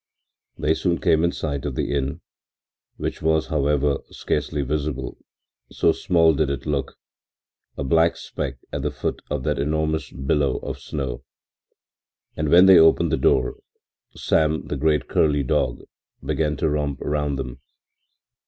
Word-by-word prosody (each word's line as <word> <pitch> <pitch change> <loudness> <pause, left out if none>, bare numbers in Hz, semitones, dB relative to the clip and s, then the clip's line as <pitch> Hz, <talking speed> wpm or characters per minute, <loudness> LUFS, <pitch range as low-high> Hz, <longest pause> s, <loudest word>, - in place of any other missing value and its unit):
They 80 - +2
soon 85 +1 0
came 80 +1 +3
in 85 - +2
sight 70 -5 -4
of 70 -3 -4
the - - -2
inn, 70 -1 -2 0.8
which - - -4
was, 80 0 +2
however, 75 -2 +1
scarcely 75 -1 -2
visible, 70 -2 -3 0.5
so - - +3
small 80 -2 +3
did 75 0 0
it 70 -1 -4
look, 70 -3 -2 0.8
a - - -2
black 80 +4 +3
speck 70 -2 -5 0.2
at - - -2
the - - -1
foot - - -4
of 75 -3 -2
that - - -1
enormous 80 +2 -1
billow 70 0 0
of - - -5
snow, 65 -3 -5 1.1
and 75 -1 -1
when 90 +4 +7
they 95 -1 +8
opened 80 0 +4
the - - +3
door 65 -2 +2 0.6
Sam, 80 0 +1
the - - -4
great 75 0 +1
curly 75 -2 +2
dog, 60 -1 0 0.4
began 75 -2 0
to 75 - 0
romp 75 -2 -2
round 75 -1 -1
them. 65 -1 -6
75 Hz, 150 wpm, -23 LUFS, 70-80 Hz, 1.1 s, they